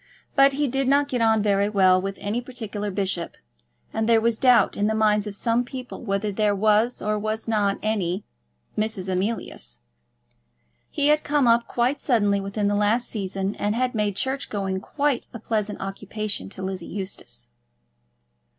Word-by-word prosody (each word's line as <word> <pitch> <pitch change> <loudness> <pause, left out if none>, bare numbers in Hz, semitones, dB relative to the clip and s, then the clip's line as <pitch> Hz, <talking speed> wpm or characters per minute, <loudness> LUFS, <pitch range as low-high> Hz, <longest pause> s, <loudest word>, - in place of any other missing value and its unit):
But 275 -1 +6
he 290 +1 0
did 270 +1 0
not 280 +1 +3
get 250 -2 -1
on 220 -2 +3
very 200 -1 +2
well 185 -3 +4
with 195 +1 -4
any 215 +4 -2
particular 220 -5 -5
bishop, 185 -3 -2 0.6
and 220 +1 0
there 230 -1 +6
was 230 0 +1
doubt 250 -2 +5
in 205 - +1
the 220 - 0
minds 210 -1 +2
of 205 - -4
some 230 +3 +1
people 250 0 -8
whether 200 -1 -1
there 205 0 +1
was 215 +4 +2
or 210 0 0
was 215 +2 -3
not 205 -3 +1
any 200 -3 -1 0.5
Mrs. 215 -3 -2
Emilius. 185 - -3 1.1
He 290 -1 +1
had 300 0 +3
come 290 -2 +2
up 235 0 +4
quite 250 +4 0
suddenly 205 -6 +2
within 200 +1 -2
the 205 - +1
last 210 +4 +1
season, 195 -1 -3
and 205 +1 0
had 255 +1 0
made 210 -3 0
church 265 +6 -2
going 195 -2 -2
quite 280 +5 -1
a - - -5
pleasant 215 -1 -2
occupation 205 +2 -4
to 190 - -8
Lizzie 190 -2 -4
Eustace. 185 - -6
215 Hz, 170 wpm, -24 LUFS, 200-235 Hz, 1.1 s, But